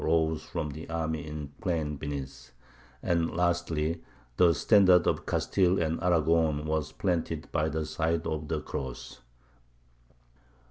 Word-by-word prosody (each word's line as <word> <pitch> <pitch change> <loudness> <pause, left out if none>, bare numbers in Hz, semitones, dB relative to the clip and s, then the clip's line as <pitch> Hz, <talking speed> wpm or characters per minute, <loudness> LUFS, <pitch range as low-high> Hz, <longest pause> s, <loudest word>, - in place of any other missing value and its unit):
rose 80 -1 +2
from 80 -4 -3
the 75 +4 -9
army 80 -2 -2
in 75 0 -5
the 70 +5 -11
plain 80 -7 -1
beneath; 70 -3 -6 0.5
and 85 -1 +1
lastly, 85 -2 0 0.3
the 90 -2 +6
standard 95 -1 +5
of - - 0
Castile 95 -1 +2
and 80 0 -1
Aragon 80 -3 +2
was 75 -1 -1
planted 90 -4 -2
by 75 +1 +1
the 80 0 -2
side 80 +1 -1
of 75 -1 -3
the 80 -1 -1
cross. 65 -3 -6
80 Hz, 135 wpm, -29 LUFS, 75-85 Hz, 0.5 s, the